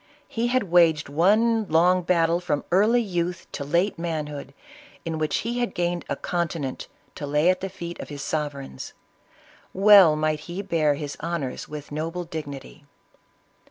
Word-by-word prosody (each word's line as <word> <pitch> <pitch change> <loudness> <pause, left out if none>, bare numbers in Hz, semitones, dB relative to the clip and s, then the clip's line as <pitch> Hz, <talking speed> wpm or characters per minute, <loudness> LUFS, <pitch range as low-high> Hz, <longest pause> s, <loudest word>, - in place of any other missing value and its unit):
He 230 +1 -1
had 255 0 +1
waged 170 -5 +3
one 215 +8 +3
long 180 +3 +4
battle 170 -1 +2
from 155 -5 -2
early 220 +6 +4
youth 175 -3 -3
to - - -5
late 170 +6 0
manhood, 150 -4 -4 0.5
in 160 -1 -3
which 155 -1 0
he 240 +1 -2
had 240 - -2
gained 175 0 -1
a - - 0
continent 165 -6 -3 0.3
to 145 - -6
lay 150 +5 +3
at 185 - -3
the 195 - -3
feet 175 -2 -8
of - - -7
his 145 -2 -6
sovereigns. 140 - -4 0.8
Well 195 -5 +7
might 155 0 0
he 185 +4 -4
bear 160 -6 +1
his 145 -1 -6
honors 160 -7 -4
with 150 -1 -8
noble 165 +4 -3
dignity 150 -2 -8
170 Hz, 160 wpm, -24 LUFS, 150-185 Hz, 0.8 s, Well